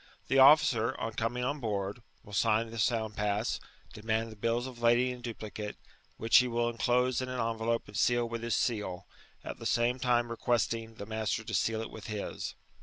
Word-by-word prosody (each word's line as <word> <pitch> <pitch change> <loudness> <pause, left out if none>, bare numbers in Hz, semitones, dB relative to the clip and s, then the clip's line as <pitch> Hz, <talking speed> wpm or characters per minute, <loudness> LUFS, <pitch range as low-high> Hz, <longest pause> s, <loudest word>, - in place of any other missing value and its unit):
The 135 - +4
officer, 130 -4 +6
on 115 0 -3
cominff 120 +3 -1
on 145 +2 -2
board, 100 -2 -3 0.2
wiU 105 - -12
sign 110 +2 +2
the 115 - -6
Sound 110 -1 0
pass, 105 +2 -1 0.3
demand 110 +1 -2
the - - -10
bills 115 +3 0
of 125 -2 -9
lading 120 +2 +4
in 125 -1 -8
duplicate, 110 -3 -6 0.4
whidi 115 +3 +6
ne 125 - -1
will 120 0 0
enclose 125 +2 +1
in 130 - -4
an 130 -1 -3
envelope 115 0 -1
and 105 - -12
seal 120 +1 +2
with 115 0 -5
his 115 -1 0
seal, 100 -5 -1 0.4
at - - -7
the - - -8
same 120 +2 +1
tune 120 -1 +2
requertiiig 115 -1 -1
the 100 - -6
master 110 +1 -2
to - - -7
seal 110 -1 +1
it - - -8
with 110 - -9
his. 105 -2 -4
115 Hz, 195 wpm, -31 LUFS, 110-120 Hz, 0.4 s, officer